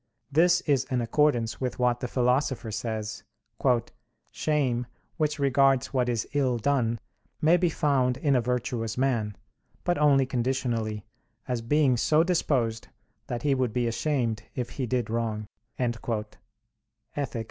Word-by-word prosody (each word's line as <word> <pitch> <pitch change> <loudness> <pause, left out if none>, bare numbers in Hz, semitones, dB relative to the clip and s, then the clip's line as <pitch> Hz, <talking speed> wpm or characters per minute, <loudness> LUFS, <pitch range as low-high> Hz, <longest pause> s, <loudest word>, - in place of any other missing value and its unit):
This 175 +4 +4
is 135 -4 +1
in 125 -1 -1
accordance 120 -1 +1
with 125 -2 -2
what 125 -1 +2
the 125 - -3
Philosopher 125 -1 0
says, 110 0 -4 1.1
"Shame, 130 -6 0 0.3
which 155 -2 0
regards 135 -1 +3
what 125 -2 +1
is 115 -3 -1
ill 130 -4 +2
done, 120 -2 +1 0.4
may 160 +3 +5
be 180 -1 +2
found 135 -6 +1
in 140 0 +2
a 125 - +3
virtuous 120 -2 -2
man, 120 -6 0 0.5
but 175 -4 0
only 140 -3 +5
conditionally; 120 -4 -1 0.4
as 125 -3 -1
being 130 +1 +3
so 155 +6 +3
disposed 130 -10 0 0.4
that 120 -1 -4
he 145 - +3
would 130 -4 0
be 125 -1 +1
ashamed 115 -3 0
if 125 -2 -3
he 130 -3 -3
did 120 -2 -1
wrong" 110 -2 -1 0.3
(Ethic. 115 -3 -2
125 Hz, 135 wpm, -27 LUFS, 115-140 Hz, 1.1 s, may